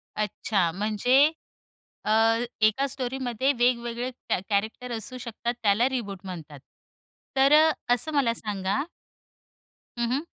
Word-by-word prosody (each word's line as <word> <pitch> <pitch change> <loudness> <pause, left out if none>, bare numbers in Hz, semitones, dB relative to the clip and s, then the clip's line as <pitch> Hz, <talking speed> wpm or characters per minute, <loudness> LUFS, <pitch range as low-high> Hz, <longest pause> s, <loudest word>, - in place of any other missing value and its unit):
अच्छा. 210 -4 0
म्हणजे 220 - +3 0.7
अ, - - +1 0.6
एका 270 +6 0
स्टोरीमध्ये 260 -1 -1
वेगवेगळे 240 0 0 0.2
कॅ - - +2
कॅरेक्टर 220 +5 -1
असू 235 +3 -5
शकतात 235 0 -3
त्याला 215 +4 +4
रिबूट 205 -7 -4
म्हणतात. 160 -6 -8 0.8
तर 270 +2 +5
अ, 315 +1 +7 0.2
असं 310 +6 0
मला 270 -5 +2
सांगा 205 +1 -2 1.2
हं, 235 0 0
हं. 275 +4 0
235 Hz, 115 wpm, -26 LUFS, 210-260 Hz, 1.2 s, अ